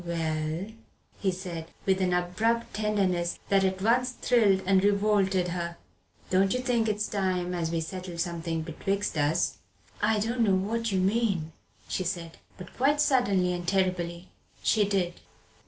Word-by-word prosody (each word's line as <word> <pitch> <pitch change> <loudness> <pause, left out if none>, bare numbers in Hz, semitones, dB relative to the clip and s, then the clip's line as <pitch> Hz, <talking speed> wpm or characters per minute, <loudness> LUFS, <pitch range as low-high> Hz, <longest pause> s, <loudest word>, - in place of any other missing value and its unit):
"Well," 160 0 -2 0.5
he 195 - +1
said, 175 -3 -6 0.2
with 190 -1 +2
an 185 -1 +2
abrupt 200 +7 0
tenderness 195 -5 0
that 195 -1 +4
at 190 0 0
once 250 +3 +3
thrilled 205 -7 +3
and 190 0 +4
revolted 200 -3 +2
her, 170 -1 -4 0.5
"don't 190 +4 +3
you - - 0
think 240 -3 +1
it's 210 0 -1
time 185 -3 -1
as 170 -2 -1
we 165 0 -1
settled 180 +1 -6
something 165 -2 -2
betwixt 195 +5 -2
us?" 155 +3 +1 0.4
"I 215 +1 +3
don't 230 +4 -1
know 200 -4 +4
what 225 +4 -1
you 190 - +1
mean," 190 -5 +1 0.4
she 185 - -2
said. 170 -2 -4 0.2
But, 180 -1 -11
quite 285 +3 +2
suddenly 200 -11 +3
and 175 0 -5
terribly, 180 -2 0 0.3
she 215 -2 +3
did. 180 -3 0
190 Hz, 155 wpm, -28 LUFS, 175-210 Hz, 0.5 s, that